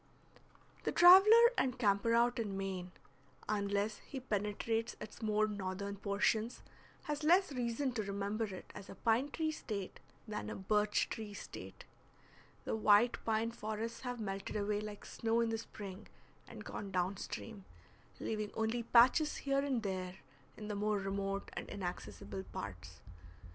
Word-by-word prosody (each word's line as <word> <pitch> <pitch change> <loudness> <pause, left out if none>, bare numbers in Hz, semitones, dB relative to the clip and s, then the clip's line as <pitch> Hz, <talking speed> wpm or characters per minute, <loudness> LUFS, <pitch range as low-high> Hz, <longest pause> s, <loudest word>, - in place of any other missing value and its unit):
The - - 0
traveler 425 +7 +9
and 255 -1 +1
camper 215 0 +3
out 240 +1 +3
in 205 -4 -2
Maine, 190 -2 -4 0.6
unless 205 0 0
he 270 - -7
penetrates 225 0 -1
its 215 - -9
more 215 -1 +2
northern 200 0 -4
portions, 205 +3 0 0.4
has 295 0 -3
less 355 +3 +5
reason 250 +1 -1
to 235 -3 -2
remember 200 +2 -2
it 190 -3 -9
as 195 - -10
a - - -8
pine 235 +5 +2
tree 315 +1 -1
State 205 -10 -5 0.3
than 210 -1 -4
a - - -4
birch 210 +2 +1
tree 215 -2 -6
State. - - -9 0.8
The - - -1
white 220 +2 +4
pine 225 +1 +1
forests 220 0 -4
have 245 -2 -4
melted 195 -2 -4
away 205 0 0
like 210 -1 -7
snow 230 0 0
in 230 -1 +2
the 225 0 -1
spring 200 -3 -8 0.4
and - - -10
gone 200 - -5
down 185 +1 0
stream, 210 -1 -7 0.5
leaving 215 -1 -2
only 225 +2 0
patches 250 +6 +5
here 275 0 +2
and 270 -5 0
there 185 -2 -3 0.4
in 210 - -7
the 210 - -3
more 210 +1 +1
remote 195 0 -3
and - - -6
inaccessible 105 - -5
parts. 85 -1 -7
215 Hz, 150 wpm, -35 LUFS, 200-235 Hz, 0.8 s, traveler